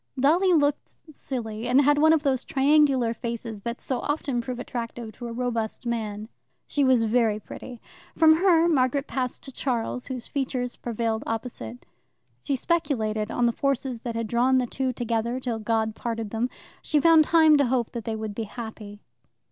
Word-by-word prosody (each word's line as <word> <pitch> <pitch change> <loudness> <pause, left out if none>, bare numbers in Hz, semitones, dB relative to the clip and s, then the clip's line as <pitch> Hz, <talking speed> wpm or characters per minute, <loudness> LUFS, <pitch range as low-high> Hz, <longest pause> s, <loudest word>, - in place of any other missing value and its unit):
Dolly 340 +8 +4
looked 290 -3 +1 0.2
silly, 230 -4 -5
and 250 +2 +4
had 290 +1 +4
one 315 +1 +6
of 320 -2 +3
those 265 -3 +1
triangular 275 -4 +3
faces 230 -2 -5
that 235 +3 -4
so 260 - -3
often 280 -4 -1
prove 250 +1 -5
attractive 235 -2 -5
to 240 +2 -8
a - - -6
robust 230 -1 -3
man. 215 -3 -3 0.4
She 290 - 0
was 260 -3 +4
very 225 -1 +2
pretty. 245 +2 -10 0.4
From 315 -1 +6
her 340 -2 +4
Margaret 275 -3 +2
passed 255 -4 -3
to 270 - -7
Charles, 250 -1 -2
whose 255 -3 -5
features 255 -3 -3
prevailed 225 -1 -2
opposite. 235 +1 -5 0.6
She 280 - -1
speculated 230 -9 -1
on 245 - +1
the 235 - +3
forces 265 -2 -2
that 235 -2 -4
had 230 0 -1
drawn 245 +4 +2
the 255 - +2
two 260 +2 -2
together 235 0 -2
till 240 -3 -3
God 220 0 0
parted 225 -2 -4
them. 230 +3 -1 0.3
She 300 - +1
found 325 +1 +6
time 315 -1 +5
to 285 - +3
hope 245 -2 0
that 235 -2 -5
they 225 - -2
would 215 -1 -5
be 225 +2 -4
happy. 215 -2 -9
245 Hz, 180 wpm, -25 LUFS, 225-275 Hz, 0.6 s, one